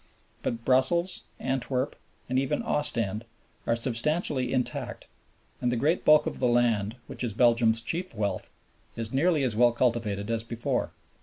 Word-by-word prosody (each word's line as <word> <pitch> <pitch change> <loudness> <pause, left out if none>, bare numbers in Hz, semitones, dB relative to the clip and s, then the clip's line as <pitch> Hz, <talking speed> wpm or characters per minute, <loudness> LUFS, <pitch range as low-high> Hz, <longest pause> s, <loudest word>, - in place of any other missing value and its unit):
But 115 -1 -3
Brussels, 150 +8 +2 0.2
Antwerp, 130 +1 -1 0.3
and 130 +1 +1
even 135 - -1
Ostend 115 - -1 0.4
are 115 - +3
substantially 130 +2 0
intact, 130 -2 -2 0.6
and 125 - +1
the - - 0
great 150 +9 +1
bulk 150 0 +6
of - - -4
the 125 - +2
land, 115 -3 +2
which - - -7
is 115 -4 -1
Belgium's 115 -1 +4
chief 170 +5 -4
wealth, 100 -3 -2 0.5
is 115 0 -4
nearly 155 +1 +3
as 120 -5 0
well 120 +2 +5
cultivated 115 -4 0
as 115 -1 0
before. 115 0 -2
120 Hz, 150 wpm, -28 LUFS, 115-135 Hz, 0.6 s, bulk